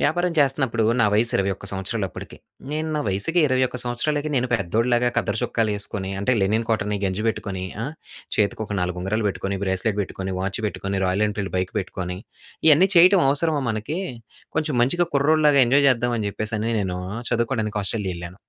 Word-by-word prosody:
వ్యాపారం 175 +3 +1
చేస్తనప్పుడు 135 -5 +2 0.2
నా 110 - +5
వయస్సు 115 +3 +3
21 95 0 -2
సంవత్సరాలప్పడికి. 95 +1 -5 0.3
నేను 155 +1 -2
నా 150 - 0
వయసుకి 100 - 0
21 130 -1 0
సంవత్సరాలకి 145 +5 -1
నేను 125 -1 +1
పెద్దోడిలాగా 120 +4 +1
కద్దర 105 - 0
చొక్కాలేసుకొని 105 -4 -1
అంటే 115 +6 +1
లెనిన్ 110 +4 +1
కాటన్ని 105 -2 0
గంజి 95 +2 -1
పెట్టుకొని 95 -4 -3 0.2
ఆ! - - -2 0.5
చేతికి 105 +1 +1
ఒక 105 - -4
4 90 0 -2
ఉంగరాలు 105 +4 -1
పెట్టుకొని, 100 0 -3
బ్రేస్‌లెట్ 100 +2 0
పెట్టుకొని, 95 -1 -4
వాచ్ 100 +3 -3
పెట్టుకొని, 100 -1 -3
'రాయల్ 95 +3 +1
ఎన్‌ఫీల్డ్' 100 -2 -4
బైక్ 90 0 -1
పెట్టుకొని 90 -1 -5 0.5
ఇయన్నీ 165 +6 +6
చేయటం 180 +2 +7
అవసరమా 145 +1 +3
మనకి 110 - -3 0.6
కొంచెం 150 -4 0
మంచిగా 175 +7 +1
కుర్రోడిలాగా 150 0 +4
ఎంజాయ్ 140 +3 +4
చేద్దామని 120 -3 +1
చెప్పేసని 110 +2 -2
నేను 90 -2 -2 0.3
చదువుకోడానికి 115 -3 -1
'ఆస్ట్రేలియా' 95 -3 -2
ఎళ్ళాను. 85 +2 -9
110 Hz, 155 wpm, -23 LUFS, 100-135 Hz, 0.6 s, చేయటం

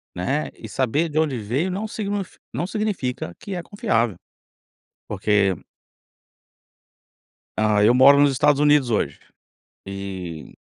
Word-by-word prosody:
né, 135 +12 -1
e - - -9
saber 140 +6 0
de 155 +1 0
onde 150 -5 0
veio 120 - -1
não 195 +4 -3
signi 205 -2 -3 0.3
não - - -2
significa 180 - -3
que 200 -5 -6
é 175 - -3
confiável, 120 - 0 0.9
porque 100 -1 +1 2.0
Hã, 105 -1 +3
eu 115 - +6
moro 135 +3 +7
nos 145 -1 +5
Estados 145 +2 +3
Unidos 145 -3 +4
hoje, 110 - -1 0.7
eh, 95 -5 -6
135 Hz, 125 wpm, -22 LUFS, 105-170 Hz, 2.0 s, moro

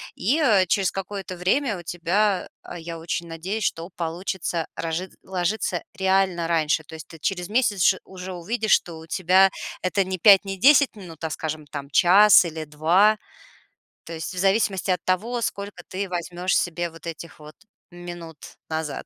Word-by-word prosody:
И, 260 - +1
э, 215 -11 +4
через 190 +1 +2
какое-то 195 -1 -6
время 205 +6 0
у 175 - -10
тебя, 180 +4 0 0.2
а, 175 - -8
я 165 0 -7
очень 170 +1 -4
надеюсь, 185 +6 -4
что 165 +2 -2
получится 170 0 -3
рожит 165 +3 -4
ложиться 190 +3 -2 0.2
реально 190 -3 +1
раньше. 160 -1 +1
То 155 - -14
есть 160 - -10
ты 165 - -12
через 180 +3 -2
месяц 215 -4 +1
ш 190 - +5
уже 185 0 -8
увидишь, 215 +6 -2
что 165 -2 +2
у 160 - -13
тебя 185 +2 +4 0.3
это 195 +2 +1
не 185 0 -4
5, 200 +2 +7
не 195 0 -4
10 280 +3 +5
минут, 175 -6 -11
а, 160 - -1
скажем, 155 0 -4
там, 140 -1 -7
час 190 +5 +7
или 160 -1 -5
2. 170 +8 +3 0.9
То 165 - -8
есть 160 +1 -5
в - - -9
зависимости 195 0 +1
от 180 -2 -1
того, 230 +7 0
сколько 200 -4 -4
ты 195 +2 -4
возьмешь 180 +1 -2
себе 175 0 -1
вот 165 0 -12
этих 165 0 -8
вот 150 0 -13 0.4
минут 175 -2 -9 0.3
назад. 160 -2 -4
180 Hz, 175 wpm, -24 LUFS, 165-195 Hz, 0.9 s, 5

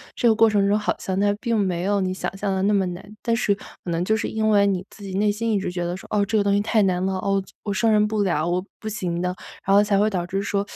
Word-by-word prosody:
这 240 - +2
个 220 - +5
过 225 0 +5
程 205 -2 +2
中 205 +1 +3
好 210 - -1
像 190 0 -2
它 205 0 +3
并 230 -1 0
没 185 -4 0
有 200 +1 +1
你 185 0 -1
想 190 - -4
象 200 -1 -1
的 190 - -1
那 205 +2 +2
么 195 -2 +2
难， 180 +1 -6 0.2
但 230 -1 +1
是 205 -3 +1
可 - - -14 0.2
能 170 +1 -1
就 220 - +2
是 220 - -2
因 220 0 -1
为 200 -1 +4
你 190 -1 -1
自 205 - -13
己 190 -1 -6
内 205 +1 +3
心 225 +2 -2
一 205 - +2
直 185 - -3
觉 175 -1 -3
得 175 +1 -3
说： - - -12
“哦， 205 -1 +3
这 215 +2 0
个 205 - +3
东 200 0 +2
西 205 - +3
太 215 0 +2
难 185 -1 +1
了， 190 0 0
哦 195 +1 0
就， - - -18
我 205 - -2
胜 225 +3 +2
任 210 0 +4
不 215 -1 -1
了， 170 -5 +1
我 180 +1 0 0.2
不 220 - -7
行 180 -5 -3
的。” 180 +1 -1 0.3
然 195 - +4
后 205 - +6
才 205 -1 +1
会 205 +2 +3
导 185 -5 -1
致 195 +2 -2
说， 200 0 0
200 Hz, 345 characters per minute, -23 LUFS, 185-210 Hz, 0.3 s, 后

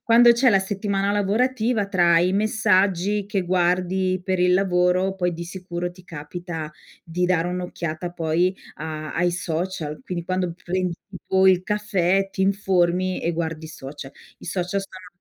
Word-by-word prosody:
quando 235 0 +7
c'è 245 +2 +4
la 195 - +5
settimana 200 0 -1
lavorativa 220 +2 +1
tra 175 -3 +4
i 180 +2 +2
messaggi 205 -1 +2
che 200 -3 -1
guardi 185 +1 +1
per 185 -1 0
il 180 0 +4
lavoro 185 0 +2
poi 180 -2 0
di 170 +1 -6
sicuro 175 -1 -5
ti 185 - -16
capita 165 -1 -6 0.3
di 175 +2 -1
dare 175 -2 +2
un'occhiata 175 -2 -4
poi 170 +2 +1 0.2
a 155 0 -6
ai 175 +1 +2
social. 165 -2 -3
Quindi 175 -2 -4
quando 185 -1 -1
prendi 180 0 -1 0.2
tipo 190 0 +1
il 185 -1 +5
caffè, 195 -1 +1
ti 190 0 -2
informi 185 -2 +1
e 170 - 0
guardi 160 -1 -3
i - - -11
social. 140 -2 -9 0.3
I - - -13
social 185 +1 -2
sono. 185 -1 -11
180 Hz, 160 wpm, -23 LUFS, 175-195 Hz, 0.3 s, quando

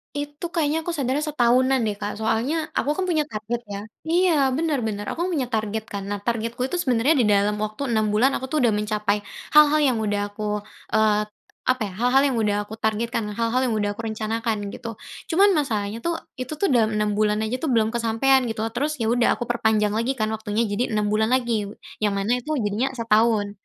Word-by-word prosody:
Itu 290 +3 -4
kayaknya 320 -2 0
aku 340 - -1
sadarnya 280 +2 -1
setahunan 255 -2 +3
deh, 210 -2 -1
Kak, 205 0 -3
soalnya 230 +9 -1
aku 295 +2 0
kan 380 - -1
punya 315 -5 0
target, 220 +1 -4
ya. 200 0 -6 0.2
Iya, 350 +1 +3 0.2
bener, 310 -4 0
bener, 205 -1 -3
aku 345 +2 -2
kan - - -3
punya 260 -4 -1
target 220 0 -1
kan. 200 -1 -5
Nah, 205 0 -4
targetku 230 0 -2
itu 350 +7 -2
sebenarnya 255 +1 +2
di 230 - +3
dalam 205 +1 +2
waktu 215 +5 -3
6 220 -1 +2
bulan, 260 +5 +4
aku 260 - -3
tuh 295 -1 0
udah 230 - +4
mencapai 210 0 0 0.3
hal-hal 300 0 +6
yang 260 -5 +2
udah 205 -1 -1
aku, 210 0 -3 0.3
eee, 215 -1 +4 0.5
apa 255 -2 +2
ya, 200 - -4
hal-hal 250 +3 +4
yang 240 - -1
udah 210 -2 +1
aku 220 +2 -10
targetkan, 220 0 -1
hal-hal 230 +2 +1
yang 225 - 0
udah 205 -1 0
aku 225 +2 -5
rencanakan, 220 -1 -2
gitu. 230 -3 -7 0.4
Cuman 400 +2 +6
masalahnya 225 - -1
tuh, 340 +6 -1 0.2
itu 255 +4 -4
tuh 305 0 0
dalam 220 -3 +3
6 210 0 +1
bulan 210 +1 +1
aja 245 +4 -2
tuh, 320 - -2
belum 225 -4 +2
kesampaian, 235 +3 +3
gitu. 225 -1 -3
Terus, 290 +6 -1
ya, 220 - +1
udah, 240 0 +3
aku - - -4
perpanjang 220 -3 +2
lagi 230 +5 0
kan 215 -2 -1
waktunya 220 +1 -1
jadi 220 +2 -1
6 210 -1 0
bulan 220 +1 +2
lagi, 235 -5 0 0.3
yang 205 -2 +1
mana 215 +6 0
itu 305 +5 -3
jadinya 210 +6 0
setahun. 220 -2 +2
225 Hz, 210 wpm, -23 LUFS, 210-265 Hz, 0.5 s, hal-hal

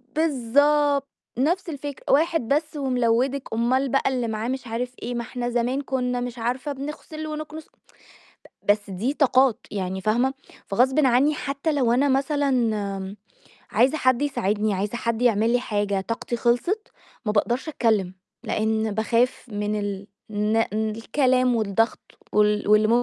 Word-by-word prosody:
بالضبط، 285 0 +2 0.3
نَفْس 340 +7 +1
الفكرة: 285 -2 -6
"واحد 315 -4 +2
بس 300 +1 0
وملوّدِك، 255 0 +1
أومال 255 +4 +1
بقى 270 +1 +2
اللي 250 -3 -1
معاه 220 +1 -3
مش 260 -1 -3
عارف 245 +2 -3
إيه، 245 +1 -3
ما 235 - -1
إحنا 245 0 -4
زمان 245 +3 0
كنا 250 -2 -1
مش 245 0 -5
عارفة 250 +5 -2
بنغسل 300 +3 -7
ونكنس." 310 +1 -6
ب - - -40 0.8
بس 205 -1 -6
دي 230 +10 -2
طاقات، 260 -4 +3
يعني 190 -1 -3
فاهمة، 240 +6 +1 0.3
فغصبٍ 260 +7 +3
عني 265 +5 +3
حتى 280 +3 -2
لو 250 -5 +2
أنا 275 +4 +3
مثلًا 235 -9 0 0.5
عايزة 260 +7 +3
حد 255 +1 +2
يساعدني، 210 -6 0
عايزة 205 +5 -2
حد 230 0 -2
يعمل 225 -1 +3
لي 245 - +3
حاجة، 205 -4 -1
طاقتي 230 +3 -3
خلصت، 245 - 0 0.3
ما 210 - +1
باقدرش 240 +8 0
أتكلم 215 -10 +1 0.3
لإن 220 0 0
باخاف 230 +4 +1
من 210 0 -2
ال 200 -1 -4 0.2
الن 210 +1 0 0.3
الكلام 255 +2 +1
والضغط 220 +1 +1 0.3
وال 210 0 +2
واللي 215 0 +5
245 Hz, 145 wpm, -24 LUFS, 220-275 Hz, 0.8 s, واللي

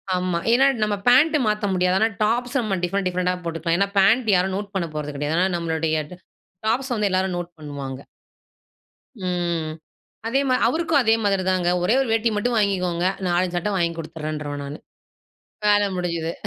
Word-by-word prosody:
ஆமா. 180 -1 -1
ஏனா, 255 +3 +5 0.2
நம்ம 210 -1 0
பேண்ட் 295 +6 +6
மாத்த 210 0 0
முடியாது. 180 0 +2
ஆனா, 220 - +4 0.2
டாப்ஸ 240 +4 0
நம்ம 200 -3 -1
டிஃபரென்ட், 195 +2 0
டிப்ரெண்டா 180 0 0
போட்டுக்கலாம். 165 0 -1
ஏனா, 200 - +3
பேண்ட் 220 +4 +4
யாரும் 185 +1 +1
நோட் 205 0 -6
பண்ண 175 -3 -1
போறது 150 -1 -4
கிடையாது. 150 +3 -1
ஏனா, 185 - +3
நம்மளுடைய 160 -1 -1 0.7
டாப்ஸ 260 +4 0
வந்து 210 -2 +1
எல்லாரும் 185 -1 0
நோட் 175 0 -5
பண்ணுவாங்க. 140 -3 -6 1.2
ம். 175 -3 -2 0.6
அதே 270 +4 +1
மாரி, 255 - +2
அவருக்கும் 320 +2 +1
அதே 220 -1 +4
மாதிரி 195 -2 +1
தாங்க, 180 -2 +1
ஒரே 200 - +3
ஒரு 270 - -1
வேட்டி 225 +1 +2
மட்டும் 235 +3 0
வாங்கிக்கோங்க, 180 -4 0 0.2
நாலஞ்சு 175 0 0
சட்டை 190 +4 -1
வாங்கிக் 170 -1 0
குடுத்துட்றேன்றுவேன் 150 -3 -5
நானு. 140 +2 -7 0.9
வேல 205 0 +4
முடிஞ்சது. 170 -2 -2
180 Hz, 165 wpm, -23 LUFS, 170-210 Hz, 1.2 s, பேண்ட்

